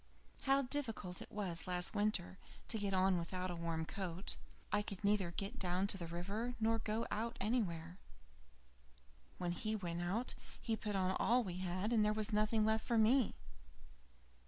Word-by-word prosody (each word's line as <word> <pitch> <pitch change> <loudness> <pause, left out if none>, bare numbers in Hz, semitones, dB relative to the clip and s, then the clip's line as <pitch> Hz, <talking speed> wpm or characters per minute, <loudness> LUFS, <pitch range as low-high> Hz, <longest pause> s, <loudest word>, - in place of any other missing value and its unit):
How 275 0 +5
difficult 235 -9 -2
it - - -9
was 185 -6 -3
last 180 -1 0
winter 205 -3 0 0.3
to 220 - +3
get 200 -1 0
on 185 -1 +3
without 180 +2 -2
a - - -3
warm 165 -1 -2
coat. 185 0 -4 0.4
I 210 - +3
could 200 -1 -6
neither 200 -3 +3
get 195 +8 -4
down 180 +1 +1
to 200 - +1
the 170 - -4
river, 200 +9 -3
nor 225 +1 +2
go 220 +1 -1
out 230 +3 -2
anywhere. 185 -6 -1 1.4
When 175 -1 -1
he 215 +5 -1
went 175 -4 -2
out 200 +8 -1 0.3
he 225 - 0
put 210 -2 -3
on 185 -1 +2
all 245 +2 +4
we 180 -3 -4
had, 185 +5 -1
and 220 -2 +5
there 210 0 +3
was 215 +1 +2
nothing 215 +1 +3
left 220 0 +2
for 235 - +1
me. 230 +2 +4
200 Hz, 175 wpm, -38 LUFS, 180-220 Hz, 1.4 s, How